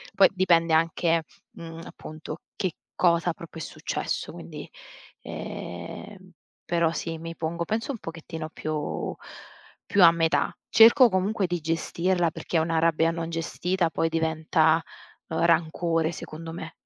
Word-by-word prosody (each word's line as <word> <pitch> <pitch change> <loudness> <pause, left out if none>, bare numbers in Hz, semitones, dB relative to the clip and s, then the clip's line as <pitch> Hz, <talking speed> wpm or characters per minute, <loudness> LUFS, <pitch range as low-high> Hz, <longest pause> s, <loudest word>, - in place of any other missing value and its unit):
Poi 190 -1 +7
dipende 170 -3 +3
anche, 165 0 +2 0.3
mhmm, 165 0 -9
appunto 155 +1 -8 0.2
che 185 -4 -1 0.2
cosa 170 0 +3
proprio 170 -2 -10
è - - -3
successo. - - -3
Quindi, - - -9 0.5
ehm, 185 - -7 0.3
però 170 -1 +2
sì, 165 0 -4
mi 165 0 -7
pongo 170 +1 -2
penso 225 - -2
un 235 - -6
pochettino 165 -1 -7
più 155 -1 -3 0.7
più 200 -3 +4
a 165 - +10
metà. 165 0 +1 0.2
Cerco 235 +3 +8
comunque 190 +1 +1
di 175 -1 -1
gestirla, 170 +2 0
perché 170 - -3
una 160 0 +1
rabbia 165 0 +3
non 165 0 -4
gestita 170 +2 -1
poi 165 - 0
diventa, 160 0 +2 0.5
uhm, 160 +1 0
rancore 165 0 +2
secondo 165 0 -8
me. 160 -1 -7
165 Hz, 135 wpm, -26 LUFS, 160-175 Hz, 0.7 s, a